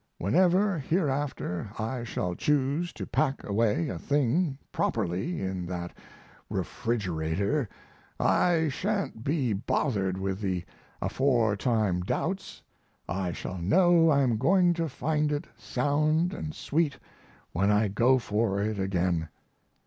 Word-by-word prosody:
Whenever 180 - +3
hereafter 140 - -1
I 115 +3 -3
shall 90 -6 -2
choose 150 - 0
to - - -6
pack 140 -3 0
away 105 -4 +1
a 85 - -4
thing 145 - +1
properly 105 - -1
in 95 -2 -3
that 85 -1 -5 0.5
refrigerator 100 - -1 0.5
I 165 -3 +3
sha'n't 195 - -2
be 135 -5 +1
bothered 100 -2 0
with 95 0 -2
the 95 -3 -1 0.4
aforetime 110 -6 +1
doubts; 190 - -3 0.4
I 95 0 -2
shall 90 +2 -5
know 170 - +4
I'm 135 -6 +3
going 175 +5 +4
to 165 -2 -2
find 150 +2 0
it 150 +3 -2
sound 155 +5 +1
and 155 -5 -5
sweet 150 -2 0 0.5
when 100 +4 +1
I 105 +1 +3
go 120 +6 +3
for 105 -4 0
it 105 0 -1
again. 90 -4 0
120 Hz, 120 wpm, -28 LUFS, 95-155 Hz, 0.5 s, know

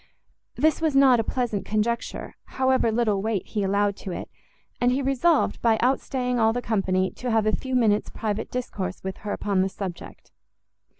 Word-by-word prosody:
This 315 +1 +2
was 315 -3 +1
not 265 -3 +6
a - - +1
pleasant 230 -4 -2
conjecture, 220 +2 -2 0.2
however 260 -3 +3
little 215 -3 +1
weight 215 -2 -1
he 210 - -3
allowed 200 +1 +1
to 190 - -7
it; - - -6 0.5
and 245 0 +4
he 260 - +1
resolved, 275 +4 +2
by 225 -2 +3
outstaying 250 0 0
all 225 0 +3
the 245 - -1
company, 190 -5 0
to 250 - -5
have 220 -2 +2
a 215 - +2
few 260 -1 -4
minutes' 215 -4 +2
private 215 -2 -3
discourse 195 -7 -4
with 190 0 -4
her 205 - -6
upon 200 -2 0
the 190 - +1
subject. 190 -3 -8
225 Hz, 180 wpm, -25 LUFS, 205-250 Hz, 0.5 s, not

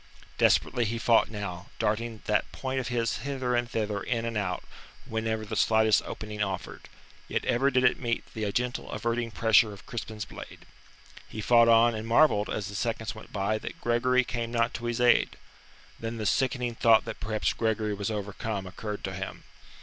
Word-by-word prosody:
Desperately 120 - +3
he 115 +2 -2
fought 115 0 +4
now, 100 -4 -6
darting 110 0 -1
that 105 - +1
point 130 0 -3
of 125 - -3
his 120 -2 0
hither 130 -3 -2
and 120 0 0
thither 105 -3 -2
in 115 +1 -1
and 115 -1 -3
out 95 -4 -2 0.4
whenever 110 -1 -2
the - - -5
slightest 110 -1 +4
opening 105 -1 -6
offered; 95 -3 -4 0.4
yet - - -2
ever 135 +4 +3
did 130 -1 +2
it 125 - +4
meet 120 -3 -1
the 105 -2 -2
gentle 125 +3 -2
averting 115 0 -1
pressure 110 -1 +4
of 100 - -13
Crispin's 110 -3 -5
blade. - - -11 0.6
He 110 - -7
fought 115 +2 +5
on 115 +1 +6
and 110 0 -5
marvelled 115 -4 +4
as 105 - -3
the 100 - -8
seconds 110 +1 -2
went 110 - -12
by 105 +2 0
that - - -7
Gregory 125 +2 +2
came 120 -2 -4
not 115 +1 +1
to 120 - -5
his 120 0 -1
aid. 125 -1 +4 0.6
Then 115 +1 -4
the 110 - -3
sickening 125 +4 +1
thought 115 -1 +4
that 115 -1 -6
perhaps 110 0 -1
Gregory 110 -1 0
was 100 0 -3
overcome 105 -1 -4
occurred 105 +3 -6
to 95 - -3
him. 95 +1 -6
115 Hz, 185 wpm, -28 LUFS, 105-120 Hz, 0.6 s, on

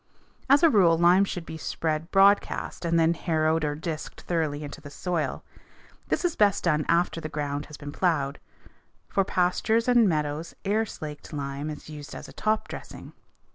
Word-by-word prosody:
As 280 +4 +6
a 330 - +8
rule 175 -6 +5
lime 175 +3 +5
should 180 -3 -5
be 160 - -7
spread 160 +1 -2
broadcast 195 -2 +3
and 170 0 +2
then 165 +1 +4
harrowed 160 -1 0
or 145 -1 -1
disked 155 0 -6
thoroughly 155 -4 -1
into 145 +2 -8
the 145 - -10
soil. 170 +2 -3 0.6
This - - 0
is 345 - 0
best 205 -1 +3
done 155 -3 +2
after 170 0 +1
the 155 - -5
ground 145 -1 -3
has 150 -2 -10
been 145 0 -7
plowed. 150 -5 0 0.7
For 195 - +2
pastures 195 +6 +1
or 250 - +4
meadows 160 -8 +1
air 215 +3 +1
slaked 150 -2 -8
lime 140 +1 -4
is 150 - -8
used 150 -2 -9
as - - -8
a - - -13
top 215 0 0
dressing. - - -9
165 Hz, 175 wpm, -26 LUFS, 150-190 Hz, 0.7 s, a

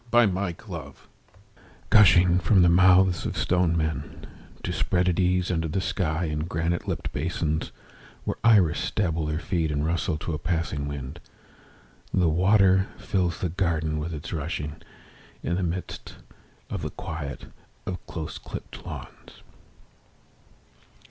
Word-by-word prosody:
In 115 -6 +5
a 95 -2 -1
Garden 85 -7 -8 1.0
Gushing 90 -3 +6
from 95 0 +4
the 90 - +6
mouths 90 0 +5
of - - -4
stone 90 -2 +2
men 75 -2 -3 0.4
To - - -2
spread 90 -1 +1
at 90 0 +1
ease 90 0 +2
under 80 -2 0
the 90 +5 -1
sky 90 -3 -1
In 75 0 -2
granite 85 +1 -1
lipped - - -3
basins, 80 0 -1 0.5
Where - - -2
iris 95 -10 +4
dabble 80 -5 0
their 75 0 -1
feet 85 -1 -1
And 75 0 -1
rustle 85 0 0
to 80 +2 -4
a 75 - -2
passing 80 -4 -2
wind, 70 -1 -6 0.9
The 90 -3 +3
water 95 +3 +4
fills 90 -4 -1
the 90 - 0
garden 80 -3 0
with 80 +3 -4
its 75 +1 -6
rushing, 75 -1 -3 0.7
In 85 - -1
the 95 - 0
midst 90 +1 -4 0.6
of - - -3
the - - -3
quiet 80 -7 -6 0.4
of 90 -1 -5
close 80 -2 -5
clipped - - -8
lawns. - - -10
85 Hz, 140 wpm, -26 LUFS, 80-90 Hz, 1.0 s, Gushing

